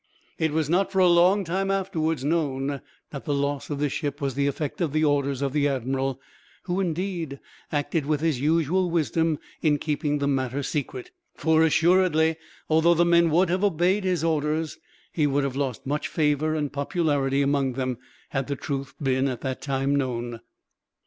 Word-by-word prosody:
It 160 Hz, -1 st, +1 dB
was 155 Hz, -1 st, 0 dB
not, 180 Hz, +5 st, +1 dB
for 190 Hz, -, -3 dB
a 185 Hz, -1 st, +6 dB
long 180 Hz, +4 st, +5 dB
time 190 Hz, +3 st, -1 dB
afterwards, 165 Hz, -7 st, -1 dB
known 140 Hz, -3 st, -1 dB, 0.3 s
that 140 Hz, -, -7 dB
the 145 Hz, -, 0 dB
loss 140 Hz, 0 st, -2 dB
of 145 Hz, -, -2 dB
this 145 Hz, -1 st, -1 dB
ship 145 Hz, -2 st, -3 dB
was 140 Hz, -3 st, -1 dB
the 140 Hz, +2 st, 0 dB
effect 145 Hz, +4 st, -3 dB
of 160 Hz, -5 st, 0 dB
the 155 Hz, 0 st, +2 dB
orders 140 Hz, -2 st, +1 dB
of 135 Hz, -1 st, -1 dB
the 145 Hz, -1 st, +2 dB
admiral; 135 Hz, 0 st, -1 dB, 0.4 s
who, 180 Hz, +1 st, -2 dB
indeed, 170 Hz, -5 st, -2 dB, 0.3 s
acted 145 Hz, 0 st, -1 dB
with 150 Hz, -1 st, +1 dB
his 155 Hz, -6 st, 0 dB
usual 165 Hz, +4 st, +2 dB
wisdom 165 Hz, 0 st, +1 dB, 0.2 s
in 150 Hz, -2 st, +3 dB
keeping 150 Hz, 0 st, -1 dB
the 140 Hz, -1 st, -1 dB
matter 135 Hz, 0 st, -1 dB
secret; 260 Hz, -, -4 dB, 0.2 s
for 160 Hz, 0 st, +3 dB
assuredly, 160 Hz, -1 st, +3 dB, 0.3 s
although 160 Hz, +2 st, +4 dB
the 175 Hz, +1 st, +3 dB
men 170 Hz, -1 st, +4 dB
would 175 Hz, +3 st, +3 dB
have 185 Hz, +2 st, 0 dB
obeyed 190 Hz, +1 st, +2 dB
his 180 Hz, -4 st, 0 dB
orders, 155 Hz, 0 st, -1 dB, 0.3 s
he 150 Hz, -3 st, +1 dB
would 140 Hz, 0 st, +1 dB
have 135 Hz, -2 st, -2 dB
lost 135 Hz, -2 st, -3 dB
much 145 Hz, +3 st, -1 dB
favor 155 Hz, 0 st, +1 dB
and 150 Hz, -2 st, -2 dB
popularity 140 Hz, -2 st, 0 dB
among 140 Hz, -2 st, +1 dB
them, 130 Hz, -1 st, -2 dB, 0.3 s
had 135 Hz, -2 st, -2 dB
the 140 Hz, -, -2 dB
truth 140 Hz, 0 st, -5 dB
been 135 Hz, -1 st, +1 dB
at 125 Hz, -3 st, -4 dB
that 130 Hz, -1 st, -3 dB
time 135 Hz, 0 st, 0 dB
known. 120 Hz, -4 st, -2 dB
150 Hz, 180 wpm, -25 LUFS, 140-165 Hz, 0.4 s, a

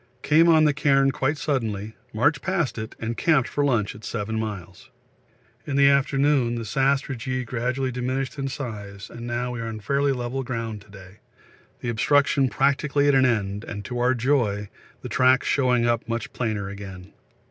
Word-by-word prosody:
Came 160 Hz, +3 st, +5 dB
on 160 Hz, -1 st, +6 dB
the 150 Hz, -1 st, +4 dB
cairn 135 Hz, -1 st, +3 dB
quite 140 Hz, +3 st, -1 dB
suddenly, 110 Hz, -7 st, -2 dB, 0.2 s
marched 135 Hz, +5 st, +1 dB
past 190 Hz, -, -1 dB
it, 110 Hz, -, -6 dB
and 115 Hz, +1 st, -3 dB
camped 150 Hz, -4 st, +2 dB
for 145 Hz, -, -1 dB
lunch 120 Hz, -8 st, +1 dB
at 105 Hz, -, -13 dB
7 110 Hz, 0 st, -3 dB
miles. 95 Hz, -5 st, -6 dB, 0.8 s
In 140 Hz, -, -2 dB
the 140 Hz, 0 st, +6 dB
afternoon 140 Hz, -2 st, +2 dB
the 115 Hz, -1 st, -4 dB
sastrugi 130 Hz, 0 st, 0 dB
gradually 130 Hz, +2 st, -2 dB
diminished 130 Hz, +3 st, -3 dB
in 135 Hz, -, -2 dB
size 105 Hz, -7 st, -7 dB
and 120 Hz, 0 st, -8 dB
now 120 Hz, +1 st, -2 dB
we 120 Hz, -, -5 dB
are 115 Hz, -, -4 dB
on 110 Hz, -1 st, -5 dB
fairly 140 Hz, +6 st, +1 dB
level 125 Hz, +1 st, -3 dB
ground 115 Hz, -4 st, -4 dB
to 105 Hz, -, -20 dB
day, 95 Hz, 0 st, -14 dB, 0.6 s
the 120 Hz, -, -3 dB
obstruction 140 Hz, +3 st, +2 dB
practically 140 Hz, +1 st, +1 dB
at 145 Hz, -, +4 dB
an 130 Hz, -1 st, +5 dB
end, 105 Hz, -3 st, -1 dB
and, 105 Hz, -3 st, -7 dB
to 125 Hz, +1 st, -4 dB
our 125 Hz, +1 st, +3 dB
joy, 115 Hz, -6 st, 0 dB, 0.3 s
the -, -, -4 dB
tracks 130 Hz, 0 st, +3 dB
showing 125 Hz, -3 st, +2 dB
up 120 Hz, 0 st, 0 dB
much 115 Hz, -1 st, -3 dB
plainer 110 Hz, -5 st, -2 dB
again. 100 Hz, -1 st, -9 dB
125 Hz, 180 wpm, -24 LUFS, 110-135 Hz, 0.8 s, on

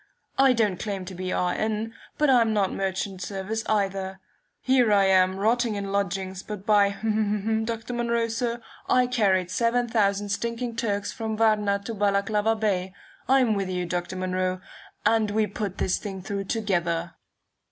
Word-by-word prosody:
I 270 Hz, -1 st, +6 dB
don't 210 Hz, -6 st, +1 dB
claim 195 Hz, -3 st, -4 dB
to 190 Hz, -, -8 dB
be 185 Hz, 0 st, -4 dB
R. 180 Hz, -1 st, +1 dB
N., 220 Hz, +1 st, -2 dB, 0.2 s
but 300 Hz, -, +3 dB
I'm 235 Hz, -4 st, +4 dB
not 195 Hz, -2 st, +1 dB
merchant 190 Hz, 0 st, -3 dB
service 205 Hz, +3 st, -3 dB
either. 195 Hz, -2 st, -1 dB, 0.4 s
Here 255 Hz, -4 st, +3 dB
I 200 Hz, -1 st, +5 dB
am, 185 Hz, 0 st, +4 dB
rotting 225 Hz, +2 st, +1 dB
in 200 Hz, -1 st, -4 dB
lodgings, 190 Hz, -1 st, -2 dB
but 205 Hz, -2 st, -7 dB
by, 205 Hz, -2 st, +4 dB, 0.7 s
Dr. 230 Hz, +1 st, -4 dB
Munro, 235 Hz, -1 st, 0 dB
sir, 235 Hz, +1 st, -2 dB, 0.3 s
I 250 Hz, 0 st, +4 dB
carried 195 Hz, -7 st, +1 dB
seven 235 Hz, +3 st, +1 dB
thousand 205 Hz, -3 st, +1 dB
stinking 235 Hz, +3 st, -2 dB
Turks 205 Hz, -3 st, -1 dB
from 220 Hz, -3 st, -4 dB
Varna 210 Hz, -2 st, +3 dB
to 230 Hz, -, -4 dB
Balaclava 205 Hz, +1 st, +1 dB
Bay. 195 Hz, -3 st, -1 dB, 0.3 s
I'm 260 Hz, -4 st, +4 dB
with 195 Hz, -2 st, -2 dB
you, 180 Hz, -1 st, -2 dB
Dr. 175 Hz, +1 st, -3 dB
Munro, 185 Hz, 0 st, -1 dB, 0.5 s
and 225 Hz, -2 st, +3 dB
we 215 Hz, +1 st, +2 dB
put 200 Hz, -1 st, -4 dB
this 185 Hz, -, 0 dB
thing 195 Hz, -3 st, -6 dB
through 200 Hz, 0 st, -3 dB
together." 175 Hz, -6 st, -1 dB
205 Hz, 160 wpm, -26 LUFS, 190-225 Hz, 0.7 s, I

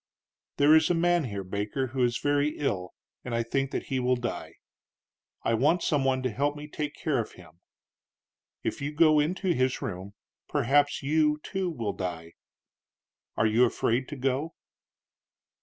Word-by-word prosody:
"There 145 Hz, +2 st, +6 dB
is 160 Hz, 0 st, +4 dB
a 175 Hz, -, +3 dB
man 175 Hz, -1 st, +2 dB
here, 100 Hz, -4 st, -4 dB
Baker, 105 Hz, +7 st, -2 dB
who 130 Hz, -2 st, +1 dB
is 120 Hz, -1 st, +1 dB
very 145 Hz, +1 st, +1 dB
ill, 95 Hz, -11 st, -2 dB, 0.3 s
and 120 Hz, -2 st, -3 dB
I 115 Hz, -, +1 dB
think 135 Hz, +3 st, -1 dB
that -, -, -3 dB
he 135 Hz, -2 st, -2 dB
will 125 Hz, 0 st, +2 dB
die. 120 Hz, -1 st, -5 dB, 0.9 s
I 115 Hz, -, +1 dB
want 150 Hz, +10 st, +2 dB
some 145 Hz, -5 st, +1 dB
one 130 Hz, -1 st, +1 dB
to 130 Hz, -, 0 dB
help 145 Hz, +6 st, 0 dB
me 150 Hz, 0 st, -8 dB
take 150 Hz, 0 st, -4 dB
care 145 Hz, -6 st, 0 dB
of 110 Hz, -, -4 dB
him. 85 Hz, -2 st, -16 dB, 1.0 s
If -, -, -3 dB
you 145 Hz, +2 st, -3 dB
go 155 Hz, -1 st, +5 dB
into 180 Hz, +4 st, +1 dB
his 130 Hz, -2 st, +1 dB
room, 100 Hz, -5 st, -6 dB, 0.3 s
perhaps 145 Hz, +4 st, +2 dB
you, 150 Hz, +1 st, +2 dB
too, 190 Hz, -2 st, -2 dB
will 115 Hz, -10 st, -3 dB
die. 85 Hz, -3 st, -5 dB, 1.0 s
Are -, -, +3 dB
you 110 Hz, +3 st, +4 dB
afraid 125 Hz, +1 st, +1 dB
to 145 Hz, -, -6 dB
go?" 135 Hz, +4 st, -1 dB
135 Hz, 170 wpm, -28 LUFS, 115-150 Hz, 1.0 s, There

